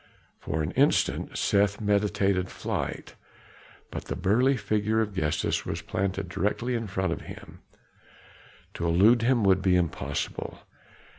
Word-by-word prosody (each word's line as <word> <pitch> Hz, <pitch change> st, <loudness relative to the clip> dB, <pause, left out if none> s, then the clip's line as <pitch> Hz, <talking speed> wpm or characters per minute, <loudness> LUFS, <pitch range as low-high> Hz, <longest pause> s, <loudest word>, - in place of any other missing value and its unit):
For 80 Hz, +1 st, -2 dB
an 75 Hz, -, -2 dB
instant 140 Hz, +7 st, +1 dB
Seth 100 Hz, 0 st, +2 dB
meditated 100 Hz, -3 st, +1 dB
flight; -, -, -4 dB, 0.8 s
but -, -, -6 dB
the -, -, -4 dB
burly 125 Hz, +7 st, +2 dB
figure 110 Hz, +1 st, 0 dB
of 110 Hz, -2 st, -1 dB
Gestas 80 Hz, -5 st, 0 dB
was -, -, -4 dB
planted 95 Hz, 0 st, -2 dB
directly 105 Hz, +7 st, -1 dB
in 115 Hz, -2 st, -2 dB
front 95 Hz, 0 st, -1 dB
of -, -, -7 dB
him; -, -, -11 dB, 1.1 s
to 85 Hz, -, -2 dB
elude 105 Hz, +8 st, +5 dB
him 120 Hz, -1 st, +2 dB
would 95 Hz, -1 st, +4 dB
be 95 Hz, -1 st, +3 dB
impossible. 85 Hz, -3 st, -2 dB
100 Hz, 135 wpm, -27 LUFS, 95-110 Hz, 1.1 s, elude